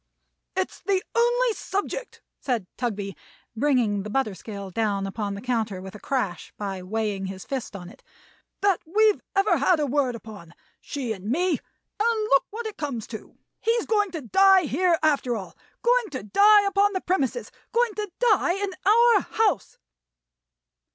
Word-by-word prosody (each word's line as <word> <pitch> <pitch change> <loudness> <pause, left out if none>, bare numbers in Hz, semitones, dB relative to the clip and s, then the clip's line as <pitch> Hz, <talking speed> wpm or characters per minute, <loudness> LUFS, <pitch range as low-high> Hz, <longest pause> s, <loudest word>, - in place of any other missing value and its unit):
"It's 375 0 -2
the 385 -2 0
only 480 0 +3
subject," 410 +5 -4 0.2
said 240 -7 -1
Tugby, 205 -5 -3 0.4
bringing 235 -6 +2
the 210 - -6
butter 260 -3 0
scale 200 +1 -8
down 200 -1 0
upon 200 +1 -3
the 200 - -7
counter 225 -5 -1
with 190 0 -9
a 210 - -10
crash, 200 - -2
by 195 -2 -4
weighing 200 0 -2
his 190 -1 -7
fist 260 -6 -4
on 180 -3 -8
it, 200 - -15 0.6
"that 395 -3 +2
we've 420 +5 +3
ever 390 +2 +3
had 360 -4 +3
a 300 - +1
word 270 -3 0
upon; 205 -7 -11 0.2
she 255 -6 -4
and 195 -2 -11
me; 355 +8 +1 0.4
and 455 +1 +2
look 275 - +4
what 455 +3 -6
it 435 - -5
comes 265 -8 -4
to! 220 - -9 0.2
He's 460 +1 +1
going 415 -2 +2
to 325 - -4
die 385 - +5
here, 335 +4 +2
after 280 -6 +2
all. 195 -4 -7 0.3
Going 485 -2 +3
to 260 -8 -6
die 405 - +6
upon 400 +1 +2
the 375 - -1
premises. 365 - -1 0.2
Going 470 -1 +2
to 420 -1 -4
die 425 -7 +3
in 395 +1 -2
our 470 +4 +6
house!" 420 - 0
285 Hz, 165 wpm, -25 LUFS, -, 0.6 s, die